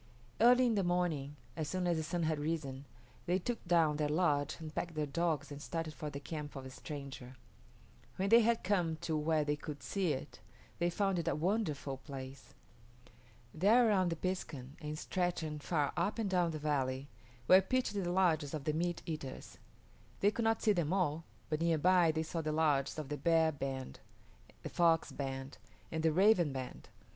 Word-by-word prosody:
Early 250 +2 +6
in 235 - +3
the 200 -2 +1
morning, 175 -6 0 0.2
as 155 -2 -3
soon 185 +1 -1
as 175 -1 +2
the 160 - -1
sun 170 +2 -2
had 155 -1 0
risen, 145 -3 -3 0.4
they 180 +2 +3
took 230 +6 -3
down 165 -4 +3
their 150 -1 0
lodge 150 -3 +1
and 155 -1 -7
packed 170 0 -3
their 155 -1 0
dogs 155 -1 -1
and 145 0 -7
started 165 -1 -4
for 155 -2 -5
the 140 - -6
camp 150 0 -6
of 135 - -6
the 130 - -8
stranger. 135 -3 -8 0.8
When 195 +1 -1
they 230 +2 +8
had 230 0 +2
come 180 -4 +1
to 160 - -1
where 155 0 +2
they 145 0 +1
could 150 0 -8
see 190 -5 0
it, 135 +2 -7 0.4
they 175 0 +2
found 195 0 0
it 170 - -4
a - - +2
wonderful 155 -6 -1
place. 135 -1 -9 1.0
There 220 +9 +5
around 185 -4 +3
the 165 - -1
piskun, 155 -7 -4
and 150 0 -4
stretching 170 -4 -2
far 145 -1 0
up 175 +6 0
and 225 -3 0
down 180 -2 +2
the 160 - -3
valley, 140 -3 -1 0.4
were 185 +1 +8
pitched 255 +3 0
the 190 -4 -1
lodges 165 -6 +2
of 150 - -5
the 155 - 0
meat 175 +2 -1
eaters. 155 -5 -6 0.6
They 205 - +4
could 230 +1 -2
not 225 0 +1
see 215 - +5
them 170 -4 0
all, 165 -4 0 0.2
but 155 0 -2
near 165 -1 +3
by 175 +1 +4
they 160 0 -1
saw 165 +1 -3
the 155 -1 -2
lodges 150 -3 +1
of 150 -3 -5
the 150 - -2
Bear 165 -1 +3
band, 135 -2 -5 0.6
the - - -4
Fox 165 -2 +3
band, 135 -3 -5 0.3
and 160 - -1
the 160 0 +3
Raven 180 -2 +4
band. 130 -1 -7
160 Hz, 195 wpm, -34 LUFS, 145-180 Hz, 1.0 s, they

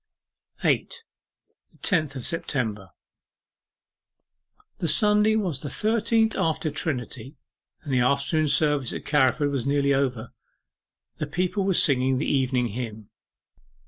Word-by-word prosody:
8. - - +1 0.8
THE - - -24
TENTH 155 -7 0
OF 130 - -6
SEPTEMBER 110 - -2 1.9
The 170 - -1
Sunday 210 +5 +4
was 180 -10 -1
the 145 - -6
thirteenth 225 - +1
after 160 0 -1
Trinity, 130 -3 -3 0.5
and 145 -4 -4
the 130 - +3
afternoon 140 +5 +1
service 145 -4 +2
at - - -7
Carriford 145 0 +2
was 135 -2 -2
nearly 140 0 +2
over. 125 -4 -2 0.8
The 150 - -3
people 180 +5 -1
were 190 -2 +1
singing 130 -4 +3
the 145 - -2
Evening 130 -3 0
Hymn. 110 -2 -7
140 Hz, 120 wpm, -25 LUFS, 130-165 Hz, 1.9 s, Sunday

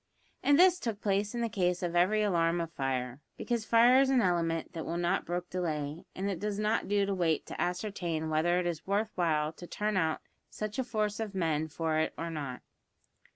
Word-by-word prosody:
And 285 0 +4
this 360 +1 +6
took 225 - -3
place 205 +1 0
in 240 - -1
the 230 - +1
case 180 -4 0
of 175 -1 -2
every 200 +5 +3
alarm 170 -4 +2
of 165 -1 -3
fire, 130 -2 -3 0.2
because 235 -3 -2
fire 240 +3 +6
is 270 -1 +4
an 265 -2 +4
element 170 -5 0
that 160 - -4
will 170 - -3
not 175 +2 0
brook 175 +1 -2
delay, 155 -3 -3
and 190 +2 -2
it 195 -4 -2
does 210 -1 -2
not 215 +2 0
do 200 0 +2
to 200 - -1
wait 170 -4 +1
to - - -6
ascertain 175 -4 -2
whether 170 +3 +2
it 180 - -2
is 170 -1 -3
worth 210 +2 0
while 155 -3 +1
to 175 +2 -11
turn 210 +1 -1
out 160 -3 0 0.3
such 215 +3 -5
a - - +2
force 215 -3 -1
of 215 -3 -4
men 160 -4 0
for 160 0 -1
it 160 - -1
or 165 +1 -4
not. 140 -5 -5
180 Hz, 215 wpm, -31 LUFS, 165-210 Hz, 0.3 s, this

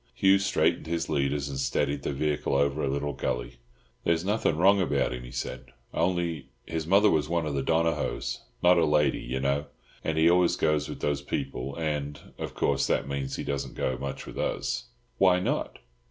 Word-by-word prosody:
Hugh 95 0 +5
straightened 100 -4 +1
his 85 0 -2
leaders 70 -1 0
and 70 -1 -4
steadied 70 +2 0
the - - -2
vehicle 75 0 -1
over 70 +2 +1
a - - +1
little 70 +1 -1
gully. - - -3 0.5
"There's 85 +1 +1
nothing 100 -6 +1
wrong 95 +3 +5
about 85 - +1
him," 60 - -5
he - - -9
said, 65 0 -6 0.2
"only—his 80 -3 -2
mother 100 +3 +5
was 75 -1 +1
one 85 -1 0
of 75 - -2
the 70 - 0
Donohoes—not 80 +3 +1
a 80 - +4
lady, 75 -1 +2
you 65 +2 -3
know—and 70 +3 -3
he 80 +1 +5
always 90 0 +4
goes 75 -1 +1
with - - -7
those 75 -1 0
people; 70 -1 -4
and, 75 -2 -2 0.2
of - - -5
course, 70 0 +1
that - - +1
means 70 -1 -3
he - - -4
doesn't 70 -1 -3
go 65 - -1
much 70 -1 -5
with - - -8
us." - - -1 0.3
"Why 90 -1 +5
not?" 90 - -2
75 Hz, 185 wpm, -28 LUFS, 70-85 Hz, 0.5 s, Hugh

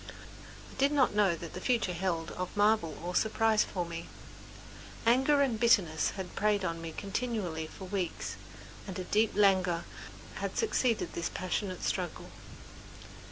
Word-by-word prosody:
I - - -13
did 275 +2 +4
not 275 -6 +3
know 205 -1 +4
what 165 0 -8
the - - -6
future 230 -8 +1
held 170 -2 -2
of 185 +2 -5
marvel 205 -7 +3
or 175 +1 -3
surprise 220 +1 +3
for 180 -2 -3
me. 170 0 -6 1.0
Anger 265 +5 +4
and 240 -5 0
bitterness 190 -9 +3
had 190 -2 -6
preyed 210 -1 +2
upon 165 -2 -2
me 165 -1 -5
continually 195 -5 -3
for 190 - -10
weeks 165 - -3 0.5
and 190 - -5
a 185 - -3
deep 215 +4 +2
languor 190 -4 +3 0.5
had - - -4
succeeded 255 - +1
this 170 0 -2
passionate 185 0 -3
struggle. - - -3
195 Hz, 150 wpm, -31 LUFS, 170-220 Hz, 1.0 s, did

